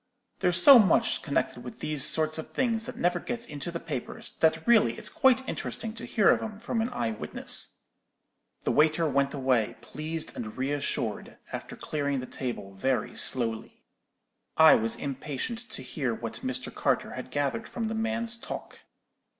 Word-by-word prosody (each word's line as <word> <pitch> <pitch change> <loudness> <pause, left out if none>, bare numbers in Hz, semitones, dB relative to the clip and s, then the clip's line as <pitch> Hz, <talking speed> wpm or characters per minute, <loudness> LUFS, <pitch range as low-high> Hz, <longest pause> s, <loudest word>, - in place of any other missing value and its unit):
There's 180 0 +3
so 270 +6 +10
much 195 -6 +3
connected - - -2
with - - -9
these 150 -3 0
sort 155 +1 +2
of 160 - -7
things 230 -3 -1
that 255 - -7
never 175 0 +1
gets 235 +4 -4
into 145 +3 -6
the 170 0 -4
papers, 145 -8 -6
that 160 -1 +2
really 215 - +4
it's - - -2
quite 260 0 +3
interesting 225 -1 -4
to 230 - -7
hear 210 -4 +3
of - - +1
'em 215 -2 -6
from 225 +1 -2
an 230 - -1
eye 120 - -2
witness.' 110 - 0 0.8
"The - - +1
waiter 155 +2 +3
went 140 -1 +1
away, 130 -5 +1
pleased 155 +1 -5
and 110 0 -6
re 135 +2 -1
assured, 145 -1 -3 0.2
after - - -6
clearing 140 -3 -2
the 130 - -5
table 120 -7 -5
very 125 +7 -1
slowly. 115 -3 0 0.7
I 160 0 +9
was 110 0 +2
impatient 150 - -4
to - - -3
hear 125 -2 -2
what 115 -1 -6
Mr. 130 -1 -3
Carter - - 0
had - - -7
gathered 145 +9 -2
from 230 -2 -3
the 220 - -3
man's 225 +1 -1
talk. - - -8
155 Hz, 175 wpm, -28 LUFS, -, 0.8 s, so